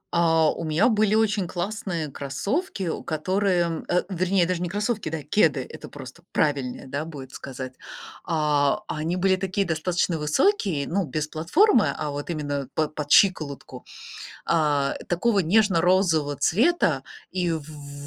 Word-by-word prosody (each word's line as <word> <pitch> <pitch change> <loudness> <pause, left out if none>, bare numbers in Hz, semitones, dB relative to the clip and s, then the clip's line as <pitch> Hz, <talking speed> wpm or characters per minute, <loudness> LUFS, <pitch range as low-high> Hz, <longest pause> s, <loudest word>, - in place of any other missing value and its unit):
А 165 -2 +4
у - - -6
меня 160 +9 +2
были 215 -1 +2
очень 210 -4 +1
классные 175 -3 -3
кроссовки, 200 - -3
о 165 - -3
которые 175 +1 0
э, 180 - +2
вернее 185 0 +1
даже 180 0 -2
не 175 - -2
кроссовки, 205 -2 -2
да, 155 -2 -4
кеды, 155 -1 +2
это - - -10
просто - - -11
правильнее, 140 -3 -1
да, 140 +3 -3
будет 140 -5 -9
сказать. 130 -1 -7 0.5
А, 150 +3 +1
они 160 +3 -2
были 190 +1 +2
такие 190 +1 -1
достаточно 170 0 -1
высокие, 165 - +1
ну, 190 0 0
без 150 +2 -3
платформы, 210 - +3
а 150 -1 -3
вот 145 +3 -6
именно 145 -4 -3
под 155 -1 0
под 150 -1 -5
щиколотку, 155 -8 +2 0.6
а, 150 -4 +1
такого 200 +5 +1
нежно-розового 175 -5 +3
цвета, 250 - +2 0.3
и 180 -2 -1
в 160 -2 -2
в 145 -1 -11
165 Hz, 145 wpm, -25 LUFS, 150-195 Hz, 0.6 s, А